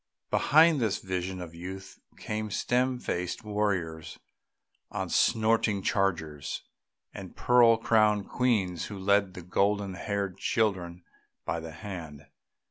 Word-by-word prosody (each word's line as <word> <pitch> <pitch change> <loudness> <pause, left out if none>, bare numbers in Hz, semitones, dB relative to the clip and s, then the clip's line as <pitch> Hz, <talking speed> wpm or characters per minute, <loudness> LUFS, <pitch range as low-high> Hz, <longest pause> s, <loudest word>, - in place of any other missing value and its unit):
Behind 160 0 +5
this 110 -5 +1
vision 95 0 -4
of 85 -2 -8
youth 95 +3 -8 0.2
came 110 0 -4
stern 125 +5 0
faced 90 -6 -3
warriors 95 -7 -2 0.7
on - - -4
snorting 110 -3 +2
chargers, 80 -7 -1 0.5
and 95 -2 -9
pearl 120 -2 +5
crowned 110 -2 +2
queens 100 -9 0
who 100 - -7
led 100 0 +2 0.2
golden 100 -1 +1
haired 100 0 -3
children 90 -5 -1 0.4
by 80 +3 -1
the 80 0 -8
hand. 85 -4 -8
100 Hz, 115 wpm, -28 LUFS, 90-110 Hz, 0.7 s, Behind